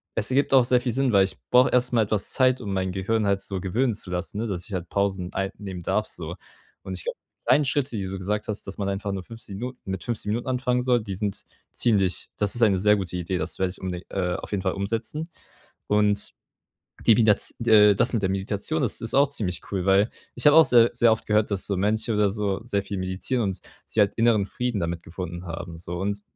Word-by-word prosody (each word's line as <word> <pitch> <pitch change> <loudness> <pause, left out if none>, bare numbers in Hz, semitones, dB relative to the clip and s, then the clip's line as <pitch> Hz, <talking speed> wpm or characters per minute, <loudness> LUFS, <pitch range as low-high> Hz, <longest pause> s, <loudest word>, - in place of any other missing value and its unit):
es - - -1
ergibt 140 +2 +2
auch 130 -2 +6
sehr 125 0 +3
viel 125 - -1
Sinn, 135 +1 +1
weil 100 -1 +6
ich 95 - -6
brauche 125 +1 +6
erst 125 0 +1
mal 115 - +4
etwas 105 -1 0
Zeit, 130 -1 +3
um 100 -4 -4
mein 95 -1 -1
Gehirn 100 +3 0
halt 100 0 +1
so 95 -2 -5
gewöhnen 115 +7 0
zu 100 -2 -7
lassen, 90 +3 -4
ne, 115 - -2
dass 90 -4 -4
ich 105 - -8
halt 90 -2 -4
Pausen 95 -3 -1
einnehmen 95 -1 -4
darf - - 0
so. - - -6 0.5
Und 95 - -6
ich 85 - -6
glaube, - - -4 0.2
die - - -51
kleinen 150 - +4
Schritte, 135 -1 -1
die 100 -3 -2
du 95 +1 -4
gesagt 105 +3 -2
hast, 105 -1 -4
dass 95 - -6
man 100 -1 -2
einfach 100 +1 -3
nur 95 -1 -4
15 115 -2 -9
Minuten 125 +3 -6
mit 95 -1 -3
15 115 -3 -3
Minuten 120 +3 -2
anfangen 125 -1 0
soll, 125 -1 +2
die 100 -3 -5
sind 100 0 -3 0.3
ziemlich 95 -6 +1
das 105 -1 +2
ist 120 - -2
eine 105 -4 +5
sehr 105 +3 +4
gute 95 -3 -3
Idee, 90 +1 -2
das 80 0 -4
werde 95 -1 0
unbeding 90 -1 -5
äh, 90 -2 -1
auf - - -7
jeden 100 -2 -1
Fall 95 - 0
umsetzen. 115 - -3 0.6
Und 105 -1 +2 0.8
die 115 - +8
Midaz 105 -2 +3
äh, 105 -3 +7
das 120 - +1
mit 115 - +1
der 95 - +2
Meditation 100 +10 -2
ist 120 - 0
ist 115 - -3
auch 140 0 +5
ziemlich 95 -10 -2
cool, 95 -3 -1
weil 100 +3 +4 0.2
ich 125 - -4
habe 150 - +7
auch 160 - +9
sehr 120 -1 +5
sehr 120 -1 +4
oft 110 - -6
gehört, 105 0 +2
dass 100 -2 0
so 100 - -1
Mönche 110 +4 0
oder 105 -1 +3
so 100 -1 -1
sehr 100 -5 -1
viel 100 0 -5
meditieren 95 +7 -1
und 95 -2 -2 0.3
sich - - -2
halt 105 -1 +4
inneren 115 -3 +3
Frieden 120 +1 -2
damit 85 0 -2
gefunden 85 +1 -7
haben 85 0 -6
so 85 +1 -5
und 100 +1 -2
100 Hz, 240 wpm, -25 LUFS, 95-115 Hz, 0.8 s, auch